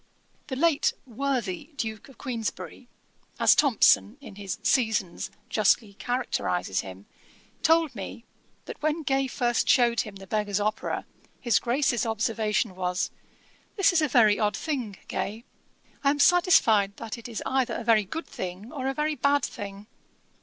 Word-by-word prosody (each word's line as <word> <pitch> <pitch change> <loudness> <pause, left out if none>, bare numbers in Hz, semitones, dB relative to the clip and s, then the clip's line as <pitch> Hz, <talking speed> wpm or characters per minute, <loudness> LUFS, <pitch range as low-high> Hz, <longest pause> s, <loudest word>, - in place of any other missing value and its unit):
The 265 - -4
late 305 +1 +2
'worthy' 260 - -3
Duke 220 -2 -5
of 270 - -17
Queensberry, 245 0 -5 0.5
as - - +6
Thomson, 255 -3 +4
in 280 - -11
his 195 -2 -5
Seasons, 220 -8 +1 0.2
justly 215 0 +2
characterises 195 - -1
him, 95 +1 -8 0.6
told 325 -3 +3
me, 230 +2 -8 0.4
that - - -9
when 310 +1 0
Gay 270 -1 +1
first 240 -2 0
shewed 240 -3 +4
him 210 -2 -8
The 195 0 -10
Beggar's 210 0 -1
Opera, 215 +1 -2 0.3
his 235 -4 +2
Grace's 245 -1 +1
observation 220 -3 0
was, 180 0 -1 0.6
'This 390 -3 +4
is 330 - +3
a 305 - +2
very 225 -5 +4
odd 210 -1 +1
thing, 250 -11 -3
Gay; 220 +3 -4 0.6
I 280 - +4
am 290 - +1
satisfied 240 - +4
that 230 +1 -6
it 230 - -9
is 225 - -5
either 265 -2 0
a - - -4
very 220 -2 +4
good 325 - -5
thing, 185 +5 -7
or 265 -4 -4
a 270 - -1
very 300 +2 0
bad 285 -1 +2
thing.' 200 0 -8
235 Hz, 155 wpm, -26 LUFS, 205-275 Hz, 0.6 s, as